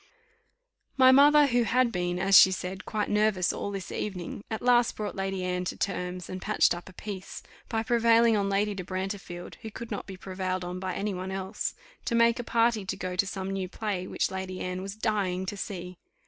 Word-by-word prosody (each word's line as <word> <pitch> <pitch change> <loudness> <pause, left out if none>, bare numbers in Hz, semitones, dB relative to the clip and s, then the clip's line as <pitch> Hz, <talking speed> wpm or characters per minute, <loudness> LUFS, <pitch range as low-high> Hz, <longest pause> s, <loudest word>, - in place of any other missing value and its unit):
My 260 -1 +8
mother, 290 +2 +7
who 245 -3 +2
had 245 +1 +2
been, 175 -2 -1
as 195 +2 +3
she 190 - +10
said, 185 0 -5
quite 210 -2 -1
nervous 210 -4 +2
all - - -4
this 195 -2 -6
evening, 190 -1 -5
at 220 0 -4
last 245 -1 +4
brought 210 -1 -4
Lady 195 -1 -2
Anne 180 0 -1
to - - -4
terms, 180 -2 -3
and 185 0 -6
patched 215 - +3
up 175 +2 -8
a - - -14
peace, 190 0 -7 0.3
by 225 -1 0
prevailing 230 -1 +4
on 200 -1 +1
Lady 205 +1 +1
de 190 -2 -5
Brantefield, 185 -1 -5
who 220 - -6
could 230 +2 -8
not 205 - -4
be 190 -1 -8
prevailed 185 -1 -3
on 180 +1 -5
by 185 -1 -3
any 205 +1 -2
one 185 +1 -5
else, 190 +2 -3 0.3
to 235 - 0
make 235 +1 +4
a - - -2
party 230 -2 +2
to 190 - -4
go 180 0 -4
to 190 +2 +1
some 190 0 -4
new 190 -2 -3
play 195 -3 -3
which - - -1
Lady 190 -1 -5
Anne 185 0 -3
was 195 +1 -6
dying 200 -4 -1
to 205 - -4
see. 180 -3 -6
195 Hz, 215 wpm, -28 LUFS, 185-220 Hz, 0.3 s, she